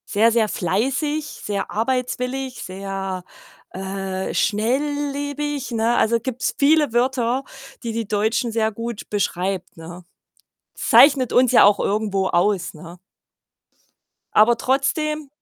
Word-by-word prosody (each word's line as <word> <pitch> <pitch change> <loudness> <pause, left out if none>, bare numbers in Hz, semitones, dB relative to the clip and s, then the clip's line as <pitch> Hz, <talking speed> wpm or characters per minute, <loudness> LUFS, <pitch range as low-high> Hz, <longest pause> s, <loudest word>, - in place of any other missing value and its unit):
Sehr 225 +3 +3
sehr 225 -1 +2
fleißig, 270 - -1
sehr 205 -8 -5
arbeitswillig, 250 +3 -2
sehr, 195 -1 -5 0.5
äh, 190 0 -4
schnelllebig, 285 +4 -1
ne? 230 +1 +1
Also, 230 +1 +2
gibt's 255 +1 -3
viele 295 -1 +3
Wörter, 250 +1 +1 0.4
die 230 -1 -3
die 225 -2 -3
Deutschen 220 +3 0
sehr 220 -1 0
gut 230 0 -6
beschreibt, 185 -3 -2
ne? 170 +2 -10 0.7
Zeichnet 270 -4 +5
uns 250 -1 +4
ja - - +7
auch 205 0 +5
irgendwo 200 -2 0
aus, 180 +1 0
ne? 170 +3 -11 1.4
Aber 220 +3 +5
trotzdem 300 +4 -1
230 Hz, 115 wpm, -21 LUFS, 195-265 Hz, 1.4 s, ja